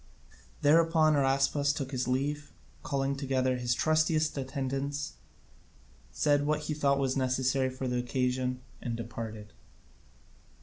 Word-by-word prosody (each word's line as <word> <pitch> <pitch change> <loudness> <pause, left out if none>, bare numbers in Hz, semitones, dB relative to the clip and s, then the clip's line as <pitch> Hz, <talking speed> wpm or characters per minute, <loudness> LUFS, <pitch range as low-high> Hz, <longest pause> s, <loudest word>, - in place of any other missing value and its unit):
Thereupon 160 +1 +5
Araspas 140 +1 +2
took 140 -2 -4
his 125 -2 -2
leave, 145 +3 -2 0.3
called 140 0 -1
together 130 -2 0
his 120 -1 0
trustiest 155 +1 +2
attendants, 135 +1 -3 1.0
said 145 -1 +2
what 150 0 +1
he 150 0 -3
thought 140 -3 +1
necessary 130 0 +1
for 130 0 -5
the 125 0 0
occasion, 125 +1 -1 0.2
and 120 -1 -3
departed. 110 -3 -7
135 Hz, 115 wpm, -30 LUFS, 130-145 Hz, 1.0 s, Thereupon